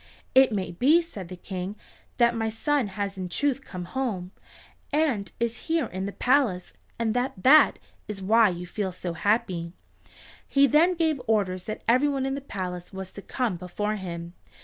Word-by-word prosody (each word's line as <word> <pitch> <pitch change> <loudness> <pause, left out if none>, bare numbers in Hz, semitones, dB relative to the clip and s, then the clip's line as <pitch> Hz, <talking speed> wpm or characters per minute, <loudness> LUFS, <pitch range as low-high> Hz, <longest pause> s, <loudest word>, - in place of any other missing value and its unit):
"It 260 -1 +6
may 190 -4 -2
be," 270 - +4
said 205 - -8
the 185 - -8
King, 185 +2 -5 0.4
"that 235 -1 +4
my 225 -1 0
son 275 +3 0
has 200 0 -4
in 185 -1 -4
truth 275 +4 0
come 180 -2 -7
home, 190 -4 -3 0.6
and 285 -10 +1
is 235 0 -2
here 325 -4 +2
in 190 -2 -4
the - - -4
palace, 245 -8 +1 0.2
and 225 -1 0
that 245 -6 -2
that 305 +4 +7 0.3
is 210 -2 -5
why 215 +3 +5
you 175 0 -5
feel 190 +1 -3
so 180 -1 -5
happy." 175 -3 0 0.7
He 275 0 +5
then 325 +6 +4
gave 320 -5 +1
orders 190 -5 +1
that 215 - -5
everyone 265 +3 +3
in 270 - -1
the 280 - -4
palace 180 -8 -5
was 190 -1 -7
to 200 - -9
come 230 -4 -2
before 210 +4 -3
him. 170 -3 -6
215 Hz, 175 wpm, -26 LUFS, 185-265 Hz, 0.7 s, that